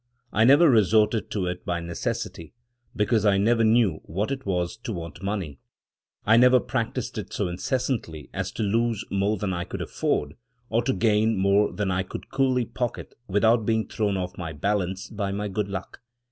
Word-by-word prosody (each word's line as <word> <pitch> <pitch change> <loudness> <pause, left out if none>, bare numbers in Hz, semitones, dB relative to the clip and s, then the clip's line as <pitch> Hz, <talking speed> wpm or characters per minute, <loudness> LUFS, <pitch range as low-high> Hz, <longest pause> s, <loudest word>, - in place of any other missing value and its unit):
I 110 - +4
never 145 +7 +7
resorted 110 - +3
to 100 -4 -2
it 90 0 -4
by 85 -1 -2
necessity, 85 +1 -4 0.4
because 110 0 +2
I 100 -2 +4
never 115 +3 +3
knew 110 -7 +3
what 100 +9 -2
it 135 -5 -4
was 90 0 -1
to 115 0 -6
want 85 -3 -7
money. 95 -8 -3 0.7
I 110 +2 +5
never 125 +1 +6
practiced 125 -1 -3
it 105 - -7
so 100 - -1
incessantly 90 - -2
as - - -3
to - - -2
lose 115 +1 0
more 100 +2 +1
than 95 0 -2
I 85 0 -2
could 90 - -6
afford, 75 0 -1 0.4
or 115 +1 +2
to 130 - +2
gain 110 -1 +2
more 100 +2 +3
than 105 -2 -2
I 95 0 +1
could 95 - -8
coolly 130 -3 +2
pocket 120 +1 -4
without 110 +4 +3
being 110 0 0
thrown 105 -3 -1
off 90 +1 -5
my 80 -3 -4
balance 95 +3 -1
by 100 -1 -3
my 105 +1 -2
good 100 +1 -2
luck. 100 +3 -6
105 Hz, 185 wpm, -25 LUFS, 95-115 Hz, 0.7 s, never